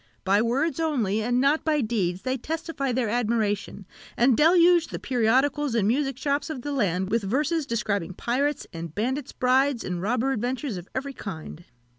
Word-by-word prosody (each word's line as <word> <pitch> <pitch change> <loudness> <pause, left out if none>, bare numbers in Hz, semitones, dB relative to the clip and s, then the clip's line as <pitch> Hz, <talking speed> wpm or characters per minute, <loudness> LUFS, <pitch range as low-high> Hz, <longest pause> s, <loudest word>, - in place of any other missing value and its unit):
By 200 +2 +3
words 275 +9 0
only, 235 -11 0
and 245 +3 +1
not 280 +4 +2
by 310 -2 +1
deeds, 195 -6 -1
they 255 0 0
testify 305 0 -3
their 245 -1 0
admiration, 215 -3 -1 0.3
and 245 +1 +4
deluge 340 +2 +5
the - - -5
periodicals 260 +3 +1
and 210 -4 +2
music 270 +2 0
shops 285 +2 -1
of 275 -6 -5
the 290 - -3
land 190 -8 0
with 230 +1 +2
verses 290 - 0
describing 200 -6 -2
pirates' 280 +7 -1
and 165 -1 -7
bandits' 260 +6 -2
brides, 260 0 +2
and 180 -1 -3
robber 245 +6 0
adventures 250 -1 -2
of 175 +1 -9
every 275 +1 -3
kind. 175 -6 -8
250 Hz, 170 wpm, -25 LUFS, 210-285 Hz, 0.3 s, deluge